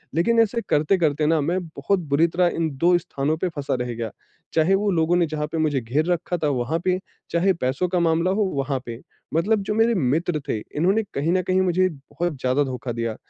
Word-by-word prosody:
लेकिन 230 +8 +3
ऐसे 230 +1 +2
करते-करते 155 -1 +2
ना 160 0 +3
मैं 175 +6 0
बहुत 160 +5 -1
बुरी 145 +4 +3
तरह 175 +2 +2
इन 165 -1 0
2 175 +4 +4
स्थानों 150 -2 -2
पे 180 +3 -1
फँसा 145 -4 -3
रह 125 -1 -3
गया, 115 -1 -4 0.4
चाहे 165 +4 +3
वो 205 +1 +1
लोगों 165 0 +2
ने 175 - +3
जहाँ 150 -1 -3
पे 165 - -2
मुझे 150 -4 +1
घेर 130 +7 0
रखा 175 +1 -1
था - - +3
वहाँ 130 +4 -1
पे, 185 0 +2 0.3
चाहे 180 +3 +3
पैसों 135 +2 -1
का 180 0 +1
मामला 170 +2 +2
हो 210 +2 +1
वहाँ 135 -1 -1
पे। 115 -1 -7 0.3
मतलब 200 +7 +2
जो 210 - -2
मेरे 225 +2 +3
मित्र 160 +1 0
थे - - 0 0.2
इन्होंने 190 +8 +2
कहीं 145 +4 0
न 185 - +2
कहीं 185 +1 +2
मुझे 185 0 +2
बहुत 165 +3 -4
ज़्यादा 130 +3 +2
धोखा 130 -2 -4
दिया। 115 -1 -3
165 Hz, 215 wpm, -23 LUFS, 140-185 Hz, 0.4 s, 2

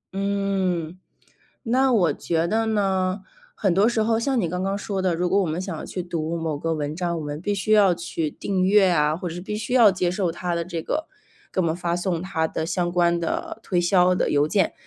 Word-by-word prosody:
嗯， 190 -4 -1 0.7
那 255 +3 +2
我 185 -8 +3
觉 165 0 -1
得 225 +4 0
呢， 195 -3 0 0.3
很 190 -4 +1
多 200 +4 +4
时 235 -2 0
候 225 +1 +2
像 245 +1 0
你 170 - -1
刚 180 +2 -3
刚 195 +1 -1
说 195 -2 -3
的， 185 -2 +1
如 180 +1 0
果 195 +2 +3
我 - - 0
们 165 +1 -2
想 185 -3 -4
要 - - -7
去 180 - -5
读 170 -1 -3
某 160 -3 -2
个 165 +3 -2
文 150 0 -3
章， 170 0 -2
我 - - -5
们 145 +1 -5
必 205 +3 -1
须 205 +2 -1
要 200 -4 +6
去 165 -2 -3
订 190 -2 -2
阅 195 0 +5
啊， 155 -3 +2
或 180 +1 -4
者 165 - -7
是 175 - -6
必 210 +3 -4
须 220 +4 -3
要 230 -5 +7
接 180 -1 -1
受 180 -1 0
它 175 +1 -3
的 170 0 -2
这 170 -2 -4
个， 310 - -3 0.4
给 - - 0
我 175 - +1
们 160 - 0
发 175 -1 -2
送 175 -2 -2
它 170 -4 -1
的 160 - -3
相 175 +1 -1
关 170 -1 +2
的 170 +5 -3
推 180 -2 +1
销 180 +1 +4
的 - - 0
邮 145 +1 +3
件。 190 +2 +1
180 Hz, 260 characters per minute, -23 LUFS, 170-200 Hz, 0.7 s, 要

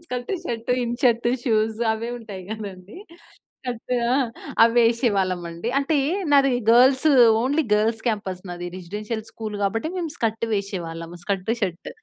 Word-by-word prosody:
Skirt, 250 -3 -5
shirt, 235 -5 -4
in 240 0 -2
shirt, 235 -2 +3 0.2
shoes 220 -2 +1
అవే 225 +1 -4
ఉంటాయి 205 -5 -9
కదండీ! 200 -3 -7 0.7
Cut 245 -1 -6 0.2
ఆ! 245 - +2 0.5
అవి 230 0 +5
వేసేవాళ్ళం 225 -6 +2
అండి. 170 +8 -5
అంటే 280 +3 +1 0.4
నాది 275 -1 +5 0.2
గర్ల్స్ 260 +5 +5 0.3
ఓన్లీ 285 +6 +1
గర్ల్స్ 220 +2 +2
క్యాంపస్ 200 -5 -2
నాది 175 0 -5
రెసిడెన్షియల్ 210 +5 -5
స్కూల్ 215 -2 -6
కాబట్టి 225 +8 0
మేము 345 -3 -2
స్కర్ట్ 225 -1 -1
వేసేవాళ్ళం. 170 -5 -4
Skirt 195 +1 -2
shirt 180 -5 -3
220 Hz, 140 wpm, -23 LUFS, 195-240 Hz, 0.7 s, అవి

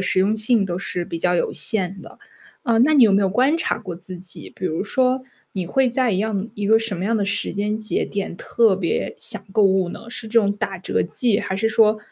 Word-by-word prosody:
实 190 0 +1
用 210 +3 +2
性 220 -1 +2
都 175 -1 -3
是 180 -2 -4
比 165 - -6
较 180 +1 +1
有 - - 0
限 195 -4 +1
的。 - - -14 0.4
哦， 230 -5 +1
那 305 +5 +4
你 270 - +6
有 210 - +4
没 200 - +4
有 195 - +2
观 260 - +2
察 - - -1
过 175 -2 -7
自 180 +1 -7
己， 180 0 -7
比 185 - -7
如 165 +3 -1
说， 255 +3 +1 0.3
你 185 -3 -3
会 265 +6 +2
在 250 -1 +1
一 185 - 0
样 215 0 -2
一 205 -1 -3
个 220 +1 +5
什 225 -4 -3
么 180 - -4
样 225 +2 +1
的 205 - 0
时 200 - -2
间 210 +1 -1
节 215 -1 -1
点， 200 -4 -4
特 220 -1 +2
别 175 -4 -2
想 - - 0
购 215 - +3
物 190 -2 +2
呢？ 230 - -9
是 245 -2 -6
这 230 +1 +4
种 200 -1 +1
打 195 -1 -4
折 180 - -1
季， 230 -5 +1
还 190 -2 -3
是 225 +3 +1
说， 215 -1 +3
205 Hz, 265 characters per minute, -21 LUFS, 190-225 Hz, 0.4 s, 你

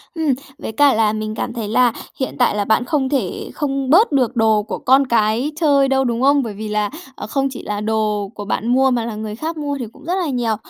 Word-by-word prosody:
Ừm, 315 -4 +1 0.2
với - - -6
cả 280 +5 +4
là 215 -1 +2
mình 215 0 -4
cảm 240 - -3
thấy 225 -3 -4
là 245 +2 +3 0.3
hiện 265 - -3
tại 245 - +3
là 205 - 0
bạn 220 +3 +2
không 270 -3 0
thể 250 -11 -2
không 275 -2 -2
bớt 360 - +5
được 255 -3 +1
đồ 220 -2 +3
của 210 - -5
con 270 +1 +4
cái 230 +4 +1
chơi 280 -4 +4
đâu, 270 0 +2
đúng 235 -1 -1
không? 280 0 +4
Bởi 220 - -5
vì 215 +1 -6
là, 210 -1 0 0.3
ờ, - - -7
không 275 +4 0
chỉ 260 - -8
là 210 0 -3
đồ 210 -2 -1
của 205 - -6
bạn 220 +2 -2
mua 260 +2 +3
mà 235 -2 0
là 230 - -5
người 215 0 -5
khác 320 +5 -4
mua 285 -1 -3
thì 240 - -3
cũng - - -16
rất 355 - -1
là 365 -3 -1
nhiều. 240 -5 0
245 Hz, 260 wpm, -19 LUFS, 215-275 Hz, 0.3 s, bớt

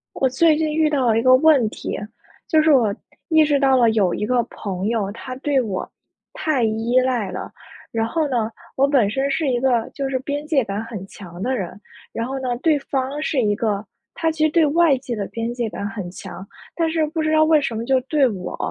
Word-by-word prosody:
我 265 - +1
最 310 +4 +3
近 310 -1 -1
遇 310 0 +2
到 280 -4 +1
了 225 -1 +3
一 - - +1
个 255 +1 +6
问 270 -5 +4
题， - - -5 0.5
就 310 -1 +3
是 315 - +4
我 230 -8 +3 0.3
意 315 -2 +5
识 290 -2 +2
到 270 -1 +4
了 235 -2 +5
有 200 -5 +2
一 210 - -2
个 250 +1 +2
朋 195 -4 -5
友， 215 -3 -1
他 255 +4 -7
对 275 0 +1
我 200 -6 -4 0.4
太 295 -6 0
依 225 +3 0
赖 250 -6 0
了。 - - -6 0.4
然 225 0 0
后 320 +6 0
呢， 235 -4 0 0.3
我 275 +1 +4
本 265 -8 +3
身 270 +5 -1
是 300 0 0
一 245 -2 +1
个 245 -3 +1
就 275 -1 -3
是 265 - 0
边 285 +3 -4
界 290 -4 +2
感 205 0 -4
很 215 -5 -7
强 175 -3 -11
的 260 +2 0
人。 190 0 -6 0.3
然 230 - -2
后 265 +2 -4
呢， 250 -2 -2
对 310 -3 +3
方 275 +1 -3
是 300 -4 0
一 210 -3 +2
个 210 -2 -1 0.3
他 325 -1 0
其 315 -1 -2
实 - - +3
对 330 0 +4
外 315 -2 +4
界 250 -1 -5
的 200 - -2
边 230 +1 -4
界 240 -2 -2
感 200 - -6
很 205 -5 -6
强。 190 +1 -9 0.3
但 330 -1 +1
是 320 -1 +1
不 320 +1 -3
知 310 0 0
道 310 0 +5
为 310 0 +4
什 260 -5 -3
么 225 - -3
就 260 +2 +2
对 275 +2 +2
我 185 -4 -6
255 Hz, 250 characters per minute, -21 LUFS, 225-295 Hz, 0.5 s, 个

